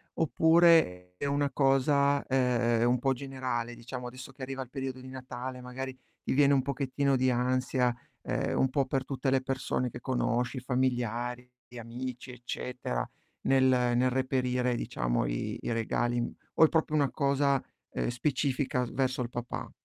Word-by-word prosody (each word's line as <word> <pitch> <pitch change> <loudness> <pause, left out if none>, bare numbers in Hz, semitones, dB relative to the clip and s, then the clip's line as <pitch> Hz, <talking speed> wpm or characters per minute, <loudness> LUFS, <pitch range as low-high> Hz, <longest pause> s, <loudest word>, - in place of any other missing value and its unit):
oppure 160 - +4
è - - -8
una 140 0 +1
cosa, 140 +1 +3
ehm, 120 -3 +2
un 125 0 +2
po' 135 +2 +2
generale 130 -3 -3
diciamo 125 +1 -7
adesso 130 +2 -9
che 135 - -15
arriva 135 +1 -4
il 130 - -7
periodo 130 -1 -4
di 130 - -10
Natale, 130 -1 -6
magari 130 +1 -6 0.2
ti - - -1
viene 140 +1 +5
un 135 - +4
pochettino 140 0 0
di 130 0 +3
ansia, 125 0 +1 0.3
ehm, - - -1
un 130 - +3
po' 135 +1 +1
per 130 0 -1
tutte 135 0 -2
le 130 0 +3
persone 130 -1 -1
che - - -9
conosci, 125 0 0
i - - -1
familiari, 125 -1 -1 0.2
gli 125 - -12
amici, 125 +2 -6
eccetera, 125 - -4 0.4
nel 135 -1 +4
nel 125 -1 +3
reperire, 125 -1 0
diciamo, - - -1
i - - -2
i - - -3
regali 120 +1 0
im 120 - -1 0.2
o 160 - +7
è - - +2
proprio 160 -2 +1
una 145 -3 +3
cosa, 140 -1 +2 0.3
ehm, - - -1
specifica 130 0 0
s - - -8
verso 130 -1 0
il 120 - -3
papà? 120 0 -5
130 Hz, 170 wpm, -30 LUFS, 125-135 Hz, 0.4 s, o